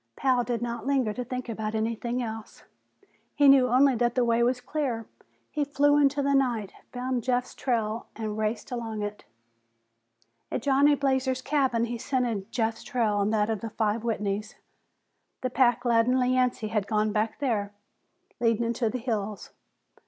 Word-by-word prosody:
Pal 255 -2 +2
did 240 -1 -2
not 235 +2 -4
linger 260 -6 +1
to 250 - -4
think 255 0 -5
about 220 -1 -3
anything 230 +3 -1
else; 220 -1 -7 0.7
he 290 -1 +5
knew 270 -2 +7
only 260 +3 +4
that 240 0 0
the 250 -2 +3
way 235 0 +2
was 250 +1 +2
clear. 250 -3 -3 0.5
He 300 - 0
flew 290 +1 +3
into 285 0 +3
the 280 0 +2
night, 240 -7 +1 0.2
found 250 0 -2
Jeff's 250 0 0
trail 230 -3 -2
and 215 -2 -4
raced 215 +3 -2
along 225 -3 -4
it. 205 0 -6 1.3
At - - -2
Johnny 285 +1 +4
Blazer's 265 -2 0
cabin, 265 -5 +1
he 235 0 -5
scented 235 -6 -2
Jeff's 225 -1 -1
trail 215 -4 0
and 200 +2 +1
that 215 0 +1
of 220 - -3
five 215 0 0
Whitneys 210 -2 -2 0.9
the 255 - -2
pack 245 -1 +2
laden 235 +2 +3
Yancey 250 -3 +1
had 210 -2 -1
gone 215 0 +1
back 215 +1 -1
there 215 -7 -1 0.7
leading 230 -1 +2
into 230 0 0
the 255 - -3
hills. 215 -4 -4
235 Hz, 160 wpm, -27 LUFS, 220-255 Hz, 1.3 s, knew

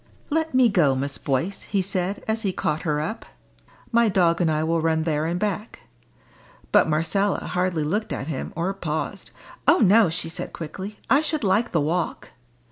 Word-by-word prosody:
"Let 320 -2 0
me 255 -1 +6
go, 165 -11 +3
Miss 140 +2 -3
Boyce," 145 +8 -1
he 200 -2 -1
said, 190 +1 -1
as 220 0 0
he 200 -4 0
caught 155 -3 -2
her 150 -3 0
up. 215 +9 -4 0.7
"My 235 -1 +4
dog 175 -3 +2
and 170 - +3
I 155 0 +1
will 165 +1 +1
run 160 0 +1
there 155 -1 0
and 175 +1 -1
back." 210 +2 -3 0.9
But - - +5
Marcella 165 +6 +1
hardly 180 -3 -1
looked 210 +9 -2
at - - -3
him, 145 -4 -4
or 175 +4 -1
paused. 160 -5 -4 0.4
"Oh - - +7
no!" 215 -1 +5
she 165 0 -3
said 165 - -5
quickly, 190 +6 -7
"I 275 - +4
should 310 -2 -2
like 205 +4 +2
the 165 - +2
walk." 165 +3 -2
180 Hz, 185 wpm, -24 LUFS, 160-205 Hz, 0.9 s, Oh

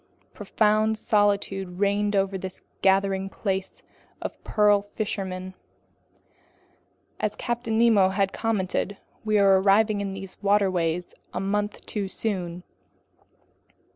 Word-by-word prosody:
Profound 215 0 +1
solitude 200 -4 0
reigned 205 +1 +1
over 195 0 +1
this 190 0 -6 0.2
gathering 195 0 +2
place 190 -2 -3 0.4
of - - -7
pearl 210 -1 +3
fishermen. 190 -3 -4 1.7
As - - -1
Captain 240 -2 -2
Nemo 220 -5 +5
had 195 0 0
commented, 200 -2 -1 0.3
we 215 -1 +2
were 195 -1 +5
arriving 205 +1 +3
in 195 -1 -3
these 195 0 -8
waterways 185 -4 +1 0.2
a - - 0
month 205 +2 -2
too 205 -2 -3
soon. 180 -4 -3
200 Hz, 110 wpm, -25 LUFS, 190-210 Hz, 1.7 s, Nemo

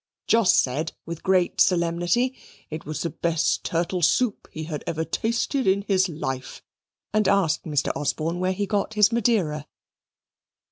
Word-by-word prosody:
Jos 225 -5 +4
said, 145 +5 +1
with 170 -1 -6
great 185 -2 +2
solemnity, 175 +8 +2 0.4
it 155 0 -6
was 155 - -3
the 170 - -2
best 165 -2 0
turtle 175 +2 -1
soup 215 +7 +1
he 155 - -6
had 155 -2 -5
ever 160 0 -2
tasted 235 - -1
in 195 +1 +3
his 190 -2 +2
life, 135 -5 -5 0.5
and 215 -2 +2
asked 190 -5 +2
Mr. 145 -4 0
Osborne 160 +4 -2
where 185 +1 +1
he 200 +2 -1
got 205 +1 -1
his 210 +1 +5
Madeira. 195 -11 0
175 Hz, 150 wpm, -24 LUFS, 160-205 Hz, 0.5 s, his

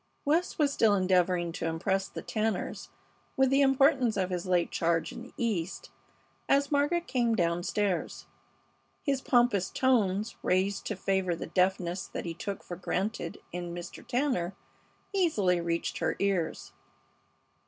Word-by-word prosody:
West 320 +5 +1
was 290 -2 +2
still 220 -5 +4
endeavoring 180 -2 +2
to 165 - -3
impress 190 +4 0
the - - -8
Tanners 215 -3 -2 0.5
with 265 0 +4
the 275 +1 +4
importance 270 -4 +4
of 185 -1 0
his 180 0 -3
late 180 -2 +2
charge 165 -1 0
in - - -8
the 250 - -12
East 200 -7 -2 0.6
as 280 +1 +3
Margaret 290 +4 +2
came 240 -3 +1
down 170 -3 +1
stairs. 195 0 -1 0.8
His 275 -3 0
pompous 240 -8 +3
tones, 215 -5 +1
raised 190 +2 0
to 210 - -2
favor 190 -2 0
the - - -5
deafness 180 0 0
that - - -6
he 170 - -3
took 195 +4 -5
for 175 - -7
granted 190 0 -3
in 175 0 -5
Mr. 175 -1 -8
Tanner, 240 -9 -1 0.6
easily 210 - +2
reached 170 0 -2
her - - 0
ears. 190 -5 -1
195 Hz, 145 wpm, -29 LUFS, 175-250 Hz, 0.8 s, still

